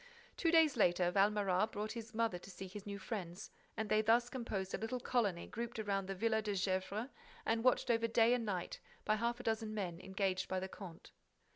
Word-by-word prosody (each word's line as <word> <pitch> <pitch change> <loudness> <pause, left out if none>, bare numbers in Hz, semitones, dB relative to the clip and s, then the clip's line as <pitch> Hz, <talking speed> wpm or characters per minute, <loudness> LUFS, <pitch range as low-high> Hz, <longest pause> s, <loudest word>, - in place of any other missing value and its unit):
Two 335 - +1
days 325 -5 +5
later, 175 -3 +4
Valméras 200 +1 +3
brought 210 +1 -3
his 230 0 -7
mother 225 -6 +1
to 185 - -12
see 190 0 -7
his 200 +2 -9
new 200 0 -4
friends 190 -3 -5 0.3
and 220 - -1
they 215 +1 +4
thus 235 +2 +3
composed 210 -7 -3
a - - -1
little 240 +3 -2
colony 210 -8 0
grouped 235 +1 -5
around 200 -3 -1
the 195 - -3
Villa 220 +2 +1
de 210 -2 -2
Gesvres 190 +5 -1 0.4
and 225 0 +1
watched 255 -1 +3
over 230 0 +2
day 230 +1 +4
and 245 -2 +1
night 190 -5 -3 0.3
by 215 - +3
half 235 +2 0
a - - -7
dozen 220 -2 -1
men 180 -5 -3
engaged 190 0 -1
by 185 - 0
the 190 - -3
comte. 185 -4 -10
210 Hz, 210 wpm, -37 LUFS, 190-230 Hz, 0.4 s, days